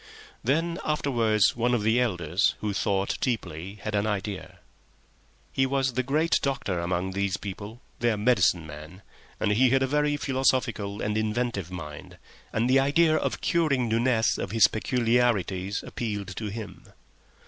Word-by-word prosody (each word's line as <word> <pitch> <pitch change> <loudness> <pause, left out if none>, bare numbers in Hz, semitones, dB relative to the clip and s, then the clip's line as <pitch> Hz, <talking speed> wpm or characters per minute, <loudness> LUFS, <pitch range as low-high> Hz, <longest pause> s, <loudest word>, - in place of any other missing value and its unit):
Then 165 +5 0
afterwards 115 -9 +2
one 120 +1 +1
of 110 - -1
the 110 +3 +3
elders, 90 -5 +1
who 105 -1 -2
thought 100 -1 0
deeply, 95 -6 -3
had 110 - -3
an 105 +1 +1
idea. 105 -2 -4 0.9
He 135 0 +1
was 135 -1 0
a 130 - +2
great 150 +6 +1
doctor 135 -10 -1
among 90 +2 -1
these 100 0 -1
people, 100 +4 -8 0.2
their 115 -2 +1
medicine 105 -6 +3
man, 75 +5 -11 0.4
and 105 - +1
he 125 +5 +4
had 135 +1 +3
a - - +3
very 150 +2 +1
philosophical 130 -7 0
and 105 +1 0
inventive 110 -4 -2
mind, 75 -5 -8 0.3
and 115 +2 +1
the 130 +2 +5
idea 155 +4 +3
of - - -1
curing 145 -8 +1
Nunez 115 0 +2
of - - -3
his 105 0 +5
peculiarities 110 -5 0
appealed 105 -4 -4
to 110 - -4
him. 105 0 -7
110 Hz, 150 wpm, -27 LUFS, 100-130 Hz, 0.9 s, the